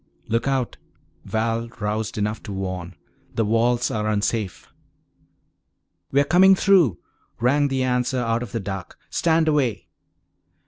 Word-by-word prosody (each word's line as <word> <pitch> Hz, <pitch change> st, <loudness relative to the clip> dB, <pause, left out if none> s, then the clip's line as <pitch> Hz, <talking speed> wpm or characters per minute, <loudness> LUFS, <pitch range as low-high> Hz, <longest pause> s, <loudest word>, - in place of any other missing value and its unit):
"Look 115 Hz, +3 st, 0 dB
out," 135 Hz, -3 st, -1 dB, 0.5 s
Val 115 Hz, +1 st, -1 dB
roused 105 Hz, -1 st, -2 dB
enough 105 Hz, +1 st, -1 dB
to 105 Hz, -, -8 dB
warn, 95 Hz, -2 st, -4 dB, 0.4 s
"the 115 Hz, -, +1 dB
walls 120 Hz, +3 st, +2 dB
are 105 Hz, -1 st, -1 dB
unsafe!" 105 Hz, -1 st, -2 dB, 1.4 s
"We're 140 Hz, +1 st, +4 dB
coming 185 Hz, +6 st, +6 dB
through," 180 Hz, -, +4 dB, 0.4 s
rang 140 Hz, +5 st, +3 dB
the 135 Hz, -1 st, 0 dB
answer 125 Hz, 0 st, 0 dB
out 115 Hz, -1 st, 0 dB
of 120 Hz, -5 st, -6 dB
the 115 Hz, -, -2 dB
dark. 95 Hz, -2 st, -6 dB
"Stand 165 Hz, -1 st, +2 dB
away!" 135 Hz, -9 st, 0 dB
115 Hz, 130 wpm, -23 LUFS, 105-135 Hz, 1.4 s, coming